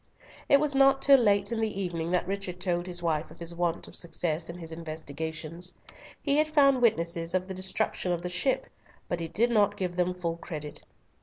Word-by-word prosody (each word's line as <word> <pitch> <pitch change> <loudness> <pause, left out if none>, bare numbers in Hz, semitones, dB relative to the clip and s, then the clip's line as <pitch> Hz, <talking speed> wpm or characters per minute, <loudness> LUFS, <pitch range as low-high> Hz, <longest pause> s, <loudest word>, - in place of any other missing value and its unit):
It 280 - +7
was 295 -1 +1
not 270 0 +5
till 275 -1 +8
late 205 -2 +3
in 225 -1 -1
the 215 -3 -1
evening 170 -3 -2
that 180 0 +1
Richard 195 -2 -4
told 175 -1 -1
his 175 -1 -4
wife 160 -2 0
of 160 - -14
his 170 0 -2
want 170 -1 -1
of - - -10
success 170 -1 -1
in 170 - -6
his 165 -2 -6
investigations. 160 +2 -5 0.5
He 285 -1 +2
had 305 0 +3
found 275 -4 +4
witnesses 170 -6 +1
of 185 0 0
the 190 - -5
destruction 185 -1 -1
of 175 -1 -2
the - - -2
ship, 185 +10 0 0.4
but 175 - -2
he 165 - -3
did 230 +9 +1
not 210 -3 +3
give 180 -2 -3
them 180 0 +1
full 170 -2 -3
credit. 150 -3 -6
180 Hz, 210 wpm, -28 LUFS, 170-205 Hz, 0.5 s, till